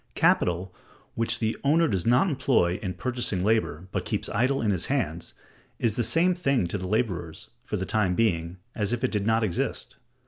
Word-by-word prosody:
Capital 90 +1 +2 0.4
which 115 0 +1
the 110 -1 -1
owner 160 +4 +4
does 95 -3 -1
not 125 +10 +4
employ 125 - +1
in 95 -3 -4
purchasing 120 -7 -2
labor, 100 -6 0
but - - -2
keeps - - -2
idle 130 +6 +1
in 110 -2 +1
his 90 -4 -2
hands, - - -2 0.4
is 115 -3 0
the 120 - 0
same 165 +11 +3
thing 140 - +1
to 90 +4 -3
the 90 - -4
laborers, 90 -7 -2
for - - -3
the 95 - -2
time 100 -4 +1
being, 85 -5 0 0.2
as 105 0 -1
if 120 +1 -2
it 130 - +1
did 105 -1 -1
not 115 0 +3
exist. 90 -6 -2
110 Hz, 195 wpm, -26 LUFS, 90-120 Hz, 0.4 s, owner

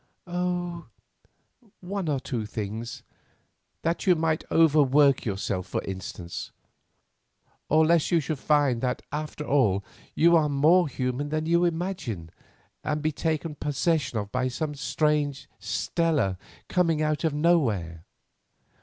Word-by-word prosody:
"Oh, 175 -1 -3 0.9
one 190 -2 -3
or 140 -2 +1
two 120 -5 -4
things; 110 +2 -5 0.8
that 165 +4 -1
you 180 - +6
might 160 -1 0
overwork 145 -3 +4
yourself, 95 -3 -2
for - - -3
instance. 90 -2 -6 1.2
Or, 155 +1 +5
lest 165 -1 +3
you 170 - +3
should 150 -1 -3
find 145 -6 +2
that 125 -1 -1
after 150 0 -4
all 105 -10 +2 0.3
you 170 +2 +5
are 155 -2 +3
more 155 +5 +4
human 130 +1 -2
than 155 +1 -1
you 170 +2 +3
imagine, 165 - -3 0.5
and 150 0 -2
be 155 - +1
taken 160 +1 -2
possession 145 -3 0
of 100 -1 -4
by 130 0 0
some 150 +4 -3
strange 150 0 0
Stella 150 - 0 0.3
coming 165 -4 +1
out 155 +1 0
of 160 -3 +1
nowhere." 115 - +1
150 Hz, 130 wpm, -26 LUFS, 125-165 Hz, 1.2 s, you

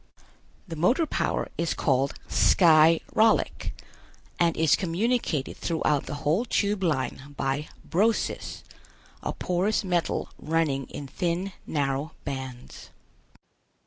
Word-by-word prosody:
The 165 - -6
motor 235 - +3
power - - -1
is 170 -1 0
called 135 -1 +1
Sky 165 -2 +5
rallic, 220 0 +2 0.6
and 170 -2 +2
is 160 -2 +4
communicated 185 - -1
throughout 150 -4 0
the 145 - -4
whole 165 +10 +3
Tube 205 -4 0
Line 145 -3 -2
by 135 +3 -1 0.2
Brosis, 215 +6 0 0.6
a - - -2
porous 185 +5 0
metal 175 -3 -1
running 150 -4 0
in 145 - -7
thin 175 +6 -2 0.2
narrow 140 0 -1
bands. 130 -2 -7
165 Hz, 110 wpm, -26 LUFS, 140-185 Hz, 0.6 s, Sky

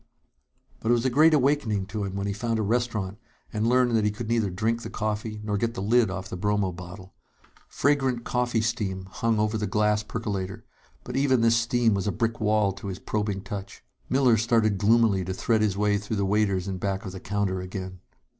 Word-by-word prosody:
But 115 - -3
it 120 - +6
was 120 +1 -1
a 130 - +2
great 155 +5 +6
awakening 130 -8 +1
to 105 0 -4
him 95 0 -5
when 100 0 -2
he 100 - -1
found 115 +2 -1
a 110 - 0
restaurant 105 -3 -1 0.3
and 110 +1 0
learned 125 -1 +3
that 110 - +2
he 105 - +3
could 110 +2 -6
neither 115 -4 +1
drink 110 +6 -1
the - - -6
coffee 105 0 -3
nor 105 -1 -1
get 115 +1 -1
the - - -4
lid 115 +1 +3
off 95 0 -5
the - - -6
bromo 105 0 0
bottle. 90 +2 -10 0.5
Fragrant 135 -4 +1
coffee 125 -2 0
steam 100 -4 -2
hung 115 +1 0
over 105 +1 0
the 105 - -1
glass 105 +2 +2
percolator, 100 -4 -4 0.4
but - - -7
even 135 -3 +3
this 115 0 +4
steam 115 -1 +2
was 100 0 -1
as - - -2
a - - +2
brick 115 +2 -1
wall 105 -1 +2
to 100 +1 -8
his 95 -2 -4
probing 105 -2 -2
touch. 100 0 -7 0.3
Miller 130 -3 +4
started 110 -3 +2
gloomily 105 -2 +3
to 95 +1 -4
thread 110 +2 +1
his 100 -3 +1
way 105 0 +2
through 105 +1 -4
the 100 - +1
waiters 100 -2 +1
in 95 -2 -3
back 95 +1 -2
of 95 - -5
the 95 - -7
counter 100 -1 -1
again. 95 0 -6
105 Hz, 220 wpm, -26 LUFS, 100-115 Hz, 0.5 s, it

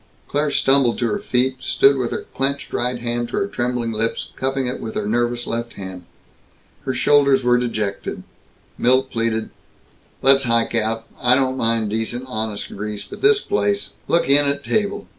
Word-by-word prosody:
Claire 150 +1 0
stumbled 135 -3 +3
to 120 - 0
her 205 - 0
feet, 130 -9 0
stood 140 +1 +4
with 125 -3 -1
her - - -4
clenched 140 +1 -2
right 125 +1 0
hand 120 0 -2
to - - -3
her 200 - +1
trembling 125 - -2
lips, 110 +1 -2
cupping 135 0 -1
it 125 +1 -3
with 110 - -6
her 105 - -2
nervous 120 +2 0
left 115 +1 -4
hand. 95 -2 -8 0.8
Her 130 - -1
shoulders 140 -1 +4
were 125 0 +4
dejected. 110 -5 -3 0.6
Milt 130 +2 +3
pleaded, 115 -1 -1 0.7
"Let's 135 0 +5
hike 115 -1 +1
out. 115 0 -1 0.2
I 125 0 +5
don't 130 -1 +1
mind 115 -4 0
decent 115 +3 -2
honest 110 -4 -4
grease, 105 0 -5
but - - -11
this 420 0 +5
place 100 0 0 0.2
look 170 - +2
in 140 +1 +5
at 140 0 0
table! 205 +2 -1
120 Hz, 175 wpm, -21 LUFS, 115-135 Hz, 0.8 s, Let's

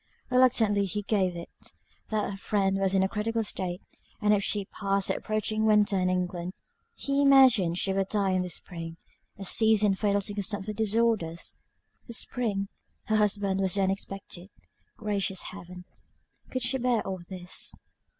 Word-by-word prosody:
Reluctantly 230 -5 +4
he 205 +2 -3
gave 190 -4 +1
it, 170 - -8 0.4
that 215 -2 -1
her 195 - -6
friend 195 -1 0
was 195 0 +1
in 190 - +4
a - - +2
critical 225 +2 -1
state; 185 -3 -3 0.4
and 210 0 +3
if 200 -1 +2
she 205 -1 +1
passed 195 0 -1
the - - +1
approaching 215 0 -1
winter 210 -2 +4
in 185 -1 +1
England, 180 -1 -2 0.4
he 275 0 0
imagined 255 -11 +6
she 190 +1 +1
would 195 0 0
die 200 -2 +1
in 185 0 +1
the 180 - -4
spring; 165 -1 -6 0.4
a 195 - -7
season 215 0 +4
fatal 200 +1 +1
to 200 +1 -3
consumptive 205 +1 -2
disorders. 220 -6 0 0.5
The 235 - -7
spring! 215 -5 -1 0.4
Her 220 - +2
husband 200 -2 +1
was 190 -1 +2
then 195 -1 +2
expected. 195 -1 -6 0.5
Gracious 200 -3 -1
Heaven, 180 -1 -10 0.6
could 255 -1 -2
she 255 +2 +1
bear 245 -3 +1
all 190 -1 -4
this. 180 -1 -2
200 Hz, 160 wpm, -28 LUFS, 190-215 Hz, 0.6 s, imagined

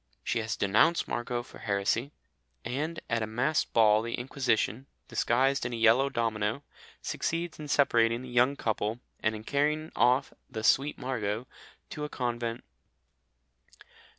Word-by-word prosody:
She 120 - 0
has 110 -1 -2
denounced 105 - +3
Margot 120 0 -2
for - - -14
heresy, 105 +6 0 0.5
and 155 +6 -2
at 115 -1 0
a 110 - -1
masked 130 +8 0
ball 110 -2 +5
the 115 +1 -3
Inquisition, 125 -1 -1 0.2
disguised 130 +4 +1
in 120 0 -3
a - - -1
yellow 115 +4 +4
domino, 115 0 -1 0.4
succeeds 165 0 -2
in 150 - -6
separating 120 -4 +3
the 130 - -8
young 125 +3 +3
couple, 110 -1 -2 0.2
and 110 0 0
in 105 - -8
carrying 150 +5 0
off 130 +3 +3 0.2
"the 110 -4 -5
sweet 140 +6 +3
Margot" 115 -3 -2 0.5
to 150 - -5
a 150 - -3
convent. 120 -3 -3
120 Hz, 145 wpm, -29 LUFS, 110-140 Hz, 0.5 s, ball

